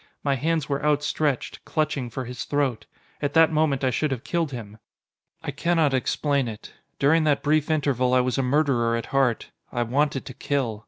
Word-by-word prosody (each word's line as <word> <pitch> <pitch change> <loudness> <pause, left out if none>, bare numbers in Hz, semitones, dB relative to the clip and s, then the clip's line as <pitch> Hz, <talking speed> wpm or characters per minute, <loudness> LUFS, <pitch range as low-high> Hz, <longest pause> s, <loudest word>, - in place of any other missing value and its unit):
My 140 - +2
hands 155 +2 0
were 140 0 -2
outstretched, 150 -2 0
clutching, 155 -5 -1
for 130 +3 -5
his 125 +1 -6
throat. 130 -7 -1 0.3
At 145 +1 -2
that 165 0 +6
moment 150 -4 +1
I 130 - +2
should 150 +5 0
have 130 -4 -3
killed 170 -4 -1
him! 110 -4 -8 0.6
I - - -3
cannot 165 -5 +1
explain 140 +1 0
it. 110 -1 -8 0.2
During 155 +4 +3
that 145 -2 +2
brief 155 +1 +2
interval 135 -5 +1
I - - +5
was 125 +1 0
a - - +3
murderer 125 -4 +2
at 115 - -3
heart. 135 -4 +1 0.2
I 120 -1 0
wanted 135 +3 0
to 130 - -8
kill. 125 -6 -2
140 Hz, 190 wpm, -25 LUFS, 125-150 Hz, 0.6 s, that